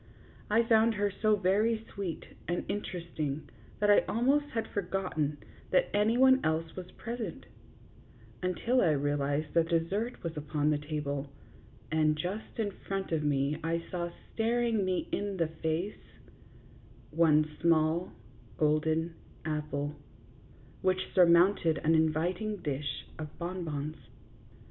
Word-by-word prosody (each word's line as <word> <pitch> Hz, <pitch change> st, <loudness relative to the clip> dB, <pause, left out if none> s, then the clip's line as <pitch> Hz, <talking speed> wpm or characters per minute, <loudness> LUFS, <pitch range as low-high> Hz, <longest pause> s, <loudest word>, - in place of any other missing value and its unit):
I 225 Hz, +3 st, +4 dB
found 225 Hz, 0 st, +4 dB
her 205 Hz, 0 st, +1 dB
so 215 Hz, +2 st, +2 dB
very 215 Hz, +4 st, +1 dB
sweet 190 Hz, -5 st, -4 dB, 0.2 s
and 175 Hz, +1 st, -1 dB
inter 200 Hz, -3 st, -3 dB
esting 155 Hz, -3 st, -3 dB, 0.4 s
that 205 Hz, 0 st, +4 dB
I 205 Hz, -, +8 dB
almost 275 Hz, +6 st, +2 dB
had 225 Hz, -1 st, -1 dB
forgotten 175 Hz, -6 st, -2 dB, 0.3 s
that -, -, +2 dB
any 215 Hz, +3 st, +3 dB
one 260 Hz, +1 st, +6 dB
else 160 Hz, +1 st, -1 dB
was 180 Hz, -1 st, -7 dB
present, 230 Hz, -6 st, -5 dB, 1.0 s
until 230 Hz, +8 st, +1 dB
I 160 Hz, -, +4 dB
realized 145 Hz, +1 st, 0 dB
that 165 Hz, -1 st, +3 dB
dessert 190 Hz, +8 st, -1 dB
was 165 Hz, -1 st, -3 dB
upon 150 Hz, 0 st, 0 dB
the 150 Hz, -, +1 dB
table, 145 Hz, -2 st, -3 dB, 0.6 s
and 155 Hz, -1 st, +3 dB
just 185 Hz, +7 st, -4 dB
in 215 Hz, -3 st, 0 dB, 0.2 s
front 195 Hz, -2 st, -2 dB
of 160 Hz, -2 st, +1 dB
me 145 Hz, 0 st, +1 dB
I 165 Hz, +1 st, 0 dB
saw 175 Hz, -1 st, -2 dB, 0.2 s
staring 230 Hz, -1 st, +1 dB
me 185 Hz, -1 st, -1 dB
in 200 Hz, -1 st, -2 dB
the 165 Hz, -3 st, +1 dB
face, 165 Hz, +6 st, -1 dB, 1.1 s
one 155 Hz, -1 st, +4 dB
small 165 Hz, +1 st, +3 dB, 0.5 s
golden 160 Hz, +2 st, +1 dB, 0.3 s
apple, 150 Hz, -1 st, -2 dB, 0.9 s
which 185 Hz, 0 st, 0 dB
surmounted 170 Hz, -2 st, +5 dB
an 160 Hz, +3 st, +2 dB
inviting 170 Hz, +7 st, +1 dB
dish 145 Hz, -1 st, -3 dB
of 155 Hz, -2 st, -7 dB
bon 180 Hz, +1 st, -4 dB
bons. 150 Hz, -1 st, -4 dB
170 Hz, 130 wpm, -31 LUFS, 155-205 Hz, 1.1 s, I